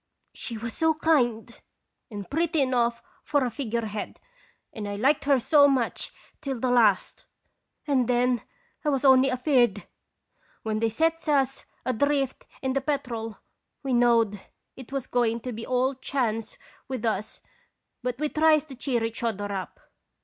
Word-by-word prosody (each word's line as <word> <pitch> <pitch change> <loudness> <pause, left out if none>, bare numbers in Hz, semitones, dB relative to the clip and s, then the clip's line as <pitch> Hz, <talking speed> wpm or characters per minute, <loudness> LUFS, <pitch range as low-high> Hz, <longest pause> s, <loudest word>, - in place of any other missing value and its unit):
She 230 - -5
was 230 +1 -5
so 320 -1 +2
kind, 240 -8 +1 0.5
and 205 -4 -7
pretty 325 +1 0
enough 240 -3 +1 0.2
for 285 -3 +1
a 245 - -2
figure 235 -3 -2
head, 210 -1 -5 0.5
and 210 -3 -5
I 205 - -3
liked 270 +9 +2
her 280 -1 +5
so 285 +3 +5
much 260 -4 0 0.3
till 270 -3 -3
the 250 +1 0
last, 220 -6 +2 0.6
and 265 -5 +2
then 245 0 +2 0.4
I 300 - +1
was 275 -1 0
only 265 0 +6
afeard. 255 -1 +2 0.8
When 215 -1 -1
they 225 0 +2
sets 325 +7 0
us 270 -3 +1 0.2
adrift 270 +2 0 0.2
in 265 0 0
the 275 - 0
Petrel 245 -6 -3 0.4
we 270 -2 -1
knowed 230 -4 +3 0.3
it 260 -1 -11
was 275 -2 -2
going 235 -2 +1
to 250 - -5
be 225 0 -7
all 255 +2 +1
chance 245 -4 -2 0.3
with 255 -3 -4
us, 215 -1 -2 0.6
but 250 -1 -2
we 300 +2 0
tries 310 0 +3
to 275 -4 -10
cheer 245 -2 -1
each 225 0 -3
other 205 -3 -2
up. 190 -4 -5
250 Hz, 155 wpm, -26 LUFS, 225-275 Hz, 0.8 s, only